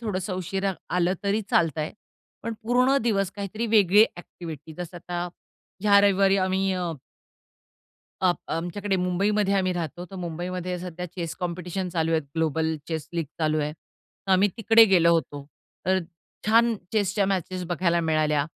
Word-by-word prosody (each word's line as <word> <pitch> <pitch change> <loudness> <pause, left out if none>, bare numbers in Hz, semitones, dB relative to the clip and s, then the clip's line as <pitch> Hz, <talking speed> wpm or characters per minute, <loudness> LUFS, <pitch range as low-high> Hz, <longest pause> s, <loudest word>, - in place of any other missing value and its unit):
थोडंसं 195 -4 -3
उशिरा 190 +2 -2 0.2
आलं 180 +1 +2
तरी 205 +2 +1
चालतं 160 -2 +2
आहे. 155 - -3 0.5
पण 230 - -3
पूर्ण 250 +4 +3
दिवस 195 -5 +1
काहीतरी 205 +3 -3
वेगळी 210 -1 +6
ॲक्टिव्हिटी, 160 -3 -9
जसं 175 0 -6
आता 175 0 -4 0.5
ह्या 200 -1 +6
रविवारी 195 -1 +4
आम्ही 190 +1 +1
अ 180 -2 -2 1.3
आप 180 -1 +3
आमच्याकडे 190 +4 -2
मुंबईमध्ये 195 +3 +1
आम्ही 185 -1 +1
राहतो, 175 +1 -4
तर - - -7
मुंबईमध्ये 180 +1 -4
सध्या 180 0 -6
चेस 170 -3 -4
कॉम्पिटिशन 180 +1 -3
चालू 165 -2 0
आहेत. 160 -2 +1
ग्लोबल 160 0 0
चेस 160 -3 -4
लीग 165 -2 -1
चालू 155 -1 +1
आहे. 150 0 -1
तर 190 +4 -10
आम्ही 190 +2 +5
तिकडे 225 0 +7
गेलो 170 -4 +5
होतो. 145 -3 -2 0.4
तर 190 0 +3 0.5
छान 230 +1 +4 0.2
चेसच्या 200 -1 +2
मॅचेस 185 -1 -2
बघायला 170 0 +1
मिळाल्या. 155 -2 +1
180 Hz, 150 wpm, -25 LUFS, 170-200 Hz, 1.3 s, तिकडे